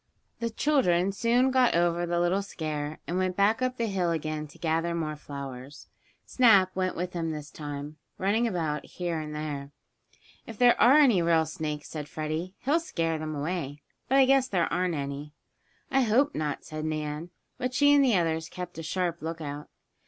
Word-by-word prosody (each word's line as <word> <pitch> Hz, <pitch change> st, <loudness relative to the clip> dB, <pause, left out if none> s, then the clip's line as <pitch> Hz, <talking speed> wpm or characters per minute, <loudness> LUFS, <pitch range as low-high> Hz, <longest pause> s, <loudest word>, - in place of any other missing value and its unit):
The 230 Hz, -, -1 dB
children 200 Hz, -, +2 dB
soon 240 Hz, +5 st, +2 dB
got 255 Hz, -5 st, +3 dB
over 175 Hz, 0 st, +1 dB
the 170 Hz, 0 st, 0 dB
little 175 Hz, +3 st, +2 dB
scare, 155 Hz, -5 st, -4 dB
and 175 Hz, +2 st, -2 dB
went 185 Hz, -1 st, 0 dB
back 210 Hz, +5 st, +3 dB
up 255 Hz, 0 st, -1 dB
the 235 Hz, -, 0 dB
hill 190 Hz, -5 st, 0 dB
again 155 Hz, -2 st, -2 dB
to 145 Hz, -, -17 dB
gather 165 Hz, +1 st, 0 dB
more 155 Hz, -2 st, -2 dB
flowers. 140 Hz, -1 st, -9 dB, 0.4 s
Snap 200 Hz, -7 st, +4 dB
went 185 Hz, 0 st, -1 dB
with 180 Hz, +1 st, -3 dB
them 165 Hz, -2 st, -2 dB
this 150 Hz, -2 st, -6 dB
time, 145 Hz, 0 st, -7 dB, 0.2 s
running 215 Hz, +5 st, +1 dB
about 160 Hz, -7 st, -2 dB
here 175 Hz, -2 st, -4 dB
and 150 Hz, -1 st, -6 dB
there. 145 Hz, -2 st, -4 dB, 0.8 s
"If 225 Hz, -, -8 dB
there 245 Hz, 0 st, +6 dB
are 265 Hz, +5 st, +7 dB
any 250 Hz, -, +5 dB
real 165 Hz, -1 st, +3 dB
snakes," 155 Hz, -1 st, -5 dB
said 150 Hz, -2 st, -6 dB
Freddie, 155 Hz, +5 st, -4 dB
"he'll 300 Hz, +5 st, +3 dB
scare 165 Hz, -, -2 dB
them 155 Hz, 0 st, -4 dB
away. 145 Hz, -2 st, -4 dB, 0.3 s
But 270 Hz, -, +4 dB
I 270 Hz, -, +7 dB
guess 270 Hz, 0 st, +4 dB
there 180 Hz, -8 st, 0 dB
aren't 180 Hz, -1 st, 0 dB
any." 140 Hz, +1 st, -5 dB, 0.6 s
"I 270 Hz, -, +4 dB
hope 255 Hz, +5 st, +3 dB
not," 150 Hz, -2 st, -3 dB
said 155 Hz, 0 st, -6 dB
Nan, 155 Hz, +1 st, -3 dB, 0.3 s
but 255 Hz, 0 st, -2 dB
she 285 Hz, +1 st, +5 dB
and 285 Hz, -1 st, +6 dB
the 250 Hz, -5 st, +3 dB
others 165 Hz, -1 st, -1 dB
kept 180 Hz, -2 st, -7 dB
a -, -, -3 dB
sharp 170 Hz, +1 st, -2 dB
lookout. 155 Hz, -2 st, -5 dB
170 Hz, 185 wpm, -28 LUFS, 155-205 Hz, 0.8 s, are